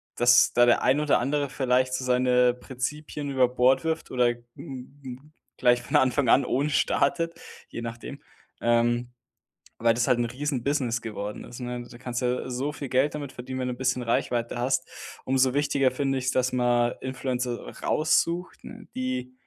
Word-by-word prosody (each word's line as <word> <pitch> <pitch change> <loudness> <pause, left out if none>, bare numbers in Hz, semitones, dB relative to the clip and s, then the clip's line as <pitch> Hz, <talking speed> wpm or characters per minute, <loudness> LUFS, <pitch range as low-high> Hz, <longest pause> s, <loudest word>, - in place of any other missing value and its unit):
dass 120 0 +5
da 120 0 +5
der 120 - +4
ein 135 +3 +3
oder 150 -1 +2
andere 140 +3 -1
vielleicht 130 -1 +1
so 130 - -2
seine 125 0 +3
Prinzipien 140 +4 -5
über 130 -2 +4
Bord 130 +1 +3
wirft 160 0 -2
oder 125 -1 +3
n 120 0 -5
n 135 0 -10 0.2
gleich 120 0 +3
von 120 - +1
Anfang 130 0 +2
an 135 - +5
ohne 140 +4 0
startet, 165 +3 +1 0.4
je - - -6
nachdem. 115 0 -7 0.4
Ähm, 120 +1 +2 0.7
weil 115 0 +3
das 120 +1 0
halt 125 -2 +3
'n - - +2
Riesenbusiness 130 -1 -1
geworden 105 -2 -5
ist, 120 - -10
ne? 125 0 -4
Da 120 - -13
kannst 120 +1 -4
du - - +1
ja 125 +1 -2
so 130 +4 -2
viel 145 -2 -6
Geld 130 +4 +1
damit 145 -3 -6
verdienen, 130 +1 -6
wenn 125 - -1
du 125 - -2
'n - - -14
bisschen 130 -1 0
Reichweite 120 0 -1
hast. 125 +2 0 0.4
Umso 130 0 +2
wichtiger 140 -2 +2
finde 135 0 -1
ich's, 130 0 -1
dass 130 0 +1
man 120 -1 +2
Influencer 125 -2 -3 0.2
raussucht, 170 +3 0
ne, 225 -2 -11
die 130 0 -3
125 Hz, 180 wpm, -26 LUFS, 120-135 Hz, 0.7 s, dass